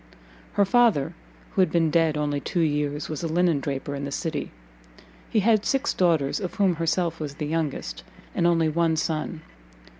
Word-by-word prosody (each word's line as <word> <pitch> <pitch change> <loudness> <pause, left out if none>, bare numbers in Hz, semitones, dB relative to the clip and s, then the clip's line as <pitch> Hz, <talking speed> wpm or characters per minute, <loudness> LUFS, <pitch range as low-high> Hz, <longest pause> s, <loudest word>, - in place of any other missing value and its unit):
Her 200 - +3
father, 230 - +3 0.4
who - - +2
had 185 - +3
been 165 -2 +2
dead 160 -2 +2
only 145 -1 0
two 175 +5 -1
years, 150 -1 0
was 155 - -4
a 170 - -1
linen 170 -1 +2
draper 140 0 -4
in 140 0 -4
the 140 - -4
city; 160 +1 -3 0.8
he 215 - +2
had 215 0 +3
six 270 +1 0
daughters, 165 -6 +2
of 185 -4 -5
whom 190 -5 +2
herself 165 0 0
was 145 -2 -5
the 150 - -4
youngest, 150 - -3 0.3
and 170 - +2
only 165 -2 +3
one 165 +1 +1
son. 155 0 -2
165 Hz, 180 wpm, -25 LUFS, 150-175 Hz, 0.8 s, Her